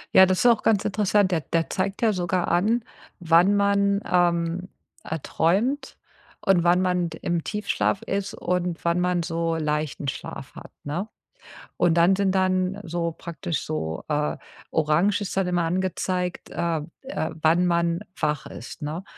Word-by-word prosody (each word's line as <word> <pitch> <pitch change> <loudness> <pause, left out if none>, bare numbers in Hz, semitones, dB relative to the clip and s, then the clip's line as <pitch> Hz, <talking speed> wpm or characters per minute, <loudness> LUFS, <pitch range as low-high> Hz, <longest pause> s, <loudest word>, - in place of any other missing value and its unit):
Ja, 190 - +10
das 185 0 +1
ist - - +1
auch 235 -3 +5
ganz 210 -3 +2
interessant. 205 -1 +2
Der 165 - +1
der 165 +2 -1
zeigt 195 +1 -2
ja 225 -2 +3
sogar 180 -1 -1
an, 215 +7 +2 0.3
wann 175 +3 +4
man, 200 0 +2
ähm, 175 0 +1 0.3
äh, 160 - -4
träumt, 240 - 0 0.5
und 185 -3 +4
wann 175 +1 +4
man 180 -2 +1
d 160 - -9
im 170 -2 -1
Tiefschlaf 210 -1 -1
ist, 195 0 -2
und 180 -1 -2
wann 170 +1 +2
man 180 -1 +1
so 165 0 -1
leichten 150 -2 -2
Schlaf 135 - -6
hat, - - -11
ne? 175 +9 -3 0.7
Und 175 -2 +3
dann 170 +3 +4
sind 195 -1 +1
dann 185 +1 +1
so 170 -2 -2
praktisch 170 -1 -4
so, 80 - -3
äh 150 -1 0 0.4
Orange 160 +7 +2
ist 200 -1 -4
dann 195 - +2
immer 180 -1 +1
angezeigt, 180 +1 -2
äh, 170 -2 -1 0.2
äh, 265 - -3
wann 165 +3 +4
man 170 0 +1 0.2
wach 150 -2 -1
ist, 130 +5 -9
ne? 155 +5 -4
175 Hz, 165 wpm, -25 LUFS, 165-195 Hz, 0.7 s, Ja